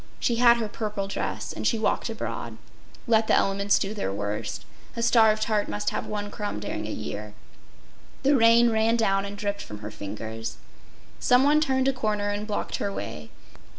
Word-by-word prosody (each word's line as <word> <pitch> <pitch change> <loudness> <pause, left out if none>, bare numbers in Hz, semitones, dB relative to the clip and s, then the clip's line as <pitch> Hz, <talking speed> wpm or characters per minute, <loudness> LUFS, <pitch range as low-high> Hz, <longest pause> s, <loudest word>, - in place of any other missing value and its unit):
She 235 - +1
had 235 0 +6
her 225 -2 -2
purple 210 -2 -3
dress 200 - -3
and - - -2
she 230 - +2
walked 220 +2 0
abroad. 225 - -5 0.5
Let 225 -2 +3
the - - +4
elements 200 +1 +2
do 200 +2 -2
their 200 - -2
worst. 105 0 -4 0.3
A 230 - -2
starved 220 -2 +5
heart 215 -2 0
must 210 0 -1
have - - -3
one 205 -1 -4
crumb 205 - -4
during 105 0 -4
a - - -4
year. 105 -1 -6 0.9
The 280 +1 +4
rain 230 -1 +6
ran 220 +1 +2
down 195 -4 +2
and 200 0 -7
dripped 205 0 -2
from 105 - -8
her 105 0 -6
fingers. 110 +3 -6 0.6
Some 250 +1 +4
one 295 +2 +4
turned 265 -3 +1
a 270 - +3
corner 210 -4 -1
and 205 +1 -3
blocked 210 - -2
her 200 - -2
way. 75 - -6
210 Hz, 185 wpm, -26 LUFS, -, 0.9 s, had